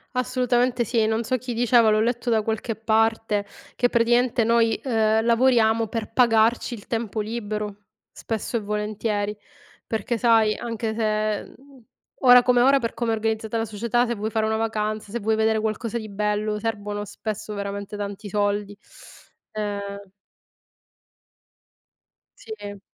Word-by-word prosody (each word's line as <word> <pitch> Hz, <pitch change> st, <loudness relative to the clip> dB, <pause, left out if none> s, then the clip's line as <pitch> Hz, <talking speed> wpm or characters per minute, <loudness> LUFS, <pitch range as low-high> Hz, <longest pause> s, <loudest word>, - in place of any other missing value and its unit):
Assolutamente 250 Hz, -1 st, +1 dB
sì. 225 Hz, 0 st, +1 dB
Non 220 Hz, +1 st, 0 dB
so 255 Hz, +3 st, 0 dB
chi 250 Hz, 0 st, -5 dB
diceva, 235 Hz, -1 st, +4 dB
l'ho 215 Hz, -, +3 dB
letto 240 Hz, +2 st, -1 dB
da 220 Hz, -1 st, +3 dB
qualche 220 Hz, +1 st, -3 dB
parte, 220 Hz, -1 st, +1 dB, 0.3 s
che, 245 Hz, -, +2 dB
praticamente, 240 Hz, 0 st, +2 dB
noi, 230 Hz, 0 st, +3 dB
ehm, 220 Hz, -3 st, +2 dB
lavoriamo 230 Hz, -1 st, +3 dB
per 220 Hz, 0 st, -5 dB
pagarci 230 Hz, 0 st, +3 dB
il 215 Hz, -4 st, -9 dB
tempo 225 Hz, -2 st, -3 dB
libero, 210 Hz, -2 st, -4 dB, 0.4 s
spesso 225 Hz, +1 st, -3 dB
e -, -, -1 dB
volentieri. 210 Hz, 0 st, -2 dB, 0.5 s
Perché, 225 Hz, +2 st, -2 dB
sai, 225 Hz, -2 st, +4 dB
anche 225 Hz, -2 st, -4 dB
se, 215 Hz, -1 st, 0 dB
mhmm, 270 Hz, -2 st, -19 dB, 0.4 s
ora 250 Hz, -1 st, +8 dB
come 245 Hz, 0 st, +3 dB
ora, 275 Hz, +2 st, +5 dB
per 230 Hz, -3 st, -3 dB
come 230 Hz, 0 st, -1 dB
è -, -, +2 dB
organizzata 220 Hz, 0 st, -2 dB
la 225 Hz, -, -1 dB
società, 235 Hz, +3 st, 0 dB
se 235 Hz, -, -2 dB
vuoi 215 Hz, +1 st, -3 dB
fare 220 Hz, 0 st, 0 dB
una 220 Hz, 0 st, 0 dB
vacanza, 215 Hz, -2 st, -2 dB
se 235 Hz, -, -3 dB
vuoi 220 Hz, +1 st, +1 dB
vedere 220 Hz, 0 st, +2 dB
qualcosa 220 Hz, +2 st, -2 dB
di 215 Hz, -1 st, -8 dB
bello, 210 Hz, +1 st, -1 dB
servono, 205 Hz, -2 st, -3 dB
spesso, 215 Hz, +1 st, -6 dB
veramente 200 Hz, 0 st, -5 dB
tanti 205 Hz, 0 st, -6 dB
soldi, 205 Hz, 0 st, -1 dB, 0.8 s
ehm 200 Hz, -2 st, -5 dB, 2.3 s
Sì. 205 Hz, -3 st, -8 dB
220 Hz, 145 wpm, -24 LUFS, 210-235 Hz, 2.3 s, ora